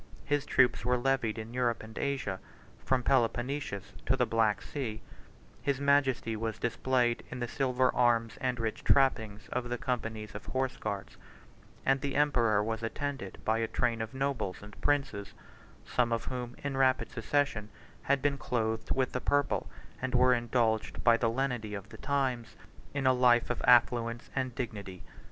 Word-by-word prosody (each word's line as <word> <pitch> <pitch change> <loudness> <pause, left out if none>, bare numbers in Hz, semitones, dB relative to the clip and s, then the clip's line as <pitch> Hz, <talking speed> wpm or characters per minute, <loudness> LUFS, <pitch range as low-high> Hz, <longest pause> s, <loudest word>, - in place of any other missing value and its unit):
His 145 -1 0
troops 125 - +3
were 125 +1 +2
levied 120 -3 0
in 110 +1 -6
Europe 120 -3 0
and 110 0 -11
Asia, 130 -9 -2 0.4
from 130 -2 +1
Peloponnesus 125 -2 0
to - - +3
the - - +3
Black 110 -2 +1
Sea; 115 -7 -4 0.6
his 140 -2 0
majesty 140 -5 +2
was 110 0 -3
displayed 120 +1 +1
in 130 - -6
the 120 - -2
silver 130 0 +1
arms 115 -2 +2
and 125 -2 -1
rich 110 -1 -3
trappings 110 -6 +2
of 125 -1 -2
the 125 - -1
companies 115 -4 -3
of 100 - -8
Horse 130 0 -1
guards; 100 -2 -5 0.7
and 135 0 +3
the 140 -1 -2
emperor 120 -8 +3
was 110 +1 -2
attended 115 -3 -4
by 110 +1 +2
a 115 - 0
train 115 0 0
of 110 +4 -5
nobles 135 -9 -2
and 105 0 -12
princes, 135 -9 0 0.5
some 120 -1 +1
of 115 -3 -1
whom, 125 -1 -5
in 140 -1 -2
rapid 130 -2 +2
succession, 120 -3 0 0.3
had 140 -1 +1
been 140 -1 +1
clothed 110 -2 -1
with 130 -1 +1
the 125 - -2
purple, 145 -1 +1 0.3
and 130 -1 -1
were 125 +1 +5
indulged 120 -2 0
by 115 - +6
the 115 0 +1
lenity 120 -4 -2
of 100 +1 -8
the - - -11
times 130 -6 -1 0.4
in 140 -2 -2
a 130 - +6
life 120 -1 +4
of 120 - -3
affluence 120 -1 +3
and 130 -2 -1
dignity. 100 -7 -5
120 Hz, 170 wpm, -31 LUFS, 110-130 Hz, 0.7 s, by